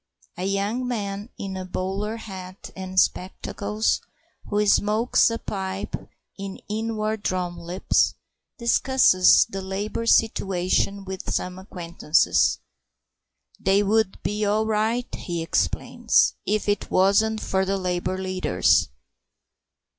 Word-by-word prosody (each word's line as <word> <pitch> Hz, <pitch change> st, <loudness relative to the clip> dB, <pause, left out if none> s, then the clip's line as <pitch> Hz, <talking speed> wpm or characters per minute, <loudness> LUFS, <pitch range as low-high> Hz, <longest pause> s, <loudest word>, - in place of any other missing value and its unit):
A 180 Hz, -, -4 dB
young 200 Hz, +6 st, -1 dB
man 205 Hz, -2 st, -3 dB
in 195 Hz, -1 st, -5 dB
a 185 Hz, -, -4 dB
bowler 195 Hz, +4 st, -3 dB
hat 190 Hz, -3 st, -9 dB
and 185 Hz, 0 st, -1 dB
spectacles, 200 Hz, +4 st, 0 dB, 0.5 s
who 210 Hz, 0 st, +1 dB
smokes 210 Hz, +4 st, +3 dB
a 230 Hz, -, -2 dB
pipe 190 Hz, -2 st, -4 dB, 0.4 s
in 195 Hz, -1 st, -6 dB
inward 215 Hz, 0 st, -2 dB
drawn 180 Hz, -3 st, -2 dB
lips, 175 Hz, +2 st, +1 dB, 0.4 s
discusses 235 Hz, -5 st, +5 dB
the 195 Hz, -, -5 dB
Labour 200 Hz, +4 st, -3 dB
situation 195 Hz, -2 st, +2 dB
with 190 Hz, -1 st, -5 dB
some 180 Hz, 0 st, -2 dB
acquaintances. 170 Hz, -4 st, +1 dB, 1.0 s
"They 195 Hz, +2 st, +3 dB
would 210 Hz, -1 st, +1 dB
be 210 Hz, +1 st, -1 dB
all 210 Hz, +1 st, +2 dB
right," 220 Hz, +3 st, 0 dB
he 170 Hz, -2 st, -4 dB
explains, 165 Hz, -, +2 dB
"if 210 Hz, 0 st, 0 dB
it 205 Hz, -1 st, 0 dB
wasn't 215 Hz, +4 st, +3 dB
for 190 Hz, 0 st, 0 dB
the 195 Hz, +1 st, 0 dB
Labour 180 Hz, 0 st, -2 dB
leaders. 185 Hz, -, +2 dB
195 Hz, 115 wpm, -24 LUFS, 185-215 Hz, 1.0 s, discusses